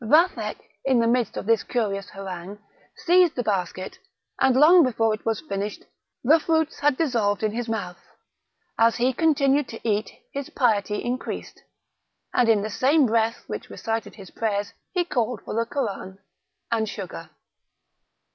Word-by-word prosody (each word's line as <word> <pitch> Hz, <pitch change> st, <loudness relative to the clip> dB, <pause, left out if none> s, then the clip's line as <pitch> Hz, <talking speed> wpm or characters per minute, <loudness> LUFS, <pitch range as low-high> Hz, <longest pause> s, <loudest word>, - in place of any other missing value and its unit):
Vathek 320 Hz, -, +3 dB, 0.3 s
in 260 Hz, -3 st, +3 dB
the 230 Hz, -, +3 dB
midst 240 Hz, 0 st, +1 dB
of -, -, -4 dB
this 225 Hz, -1 st, +3 dB
curious 200 Hz, -5 st, -2 dB
harangue, 190 Hz, 0 st, -7 dB, 0.5 s
seized 355 Hz, -1 st, +5 dB
the 245 Hz, -, -1 dB
basket, 185 Hz, -3 st, -3 dB, 0.4 s
and 265 Hz, -1 st, +4 dB
long 325 Hz, +6 st, +7 dB
before 225 Hz, -4 st, +1 dB
it 215 Hz, -, -6 dB
was 225 Hz, -, 0 dB
finished 205 Hz, -8 st, -4 dB, 0.4 s
the 305 Hz, +6 st, +5 dB
fruits 320 Hz, 0 st, 0 dB
had 290 Hz, -2 st, +2 dB
dissolved 225 Hz, -10 st, +1 dB
in 215 Hz, -, +1 dB
his 235 Hz, +1 st, -4 dB
mouth; 180 Hz, -6 st, -4 dB, 0.8 s
as 230 Hz, 0 st, +5 dB
he 250 Hz, +2 st, +1 dB
continued 285 Hz, -2 st, +2 dB
to 225 Hz, +1 st, -7 dB
eat 210 Hz, 0 st, 0 dB, 0.2 s
his 280 Hz, -1 st, -5 dB
piety 210 Hz, -4 st, +1 dB
increased, 250 Hz, +2 st, -4 dB, 0.7 s
and 245 Hz, -2 st, +3 dB
in 210 Hz, -3 st, +4 dB
the 215 Hz, -, -3 dB
same 280 Hz, +6 st, +3 dB
breath 230 Hz, 0 st, +1 dB
which -, -, -6 dB
recited 225 Hz, 0 st, -4 dB
his 195 Hz, -4 st, -12 dB
prayers 205 Hz, -2 st, -2 dB, 0.2 s
he 355 Hz, -2 st, 0 dB
called 245 Hz, -, -1 dB
for -, -, -5 dB
the 230 Hz, +1 st, 0 dB
Koran 200 Hz, -8 st, -4 dB, 0.5 s
and 220 Hz, -2 st, +1 dB
sugar. 185 Hz, -5 st, -7 dB
230 Hz, 155 wpm, -24 LUFS, 205-270 Hz, 0.8 s, long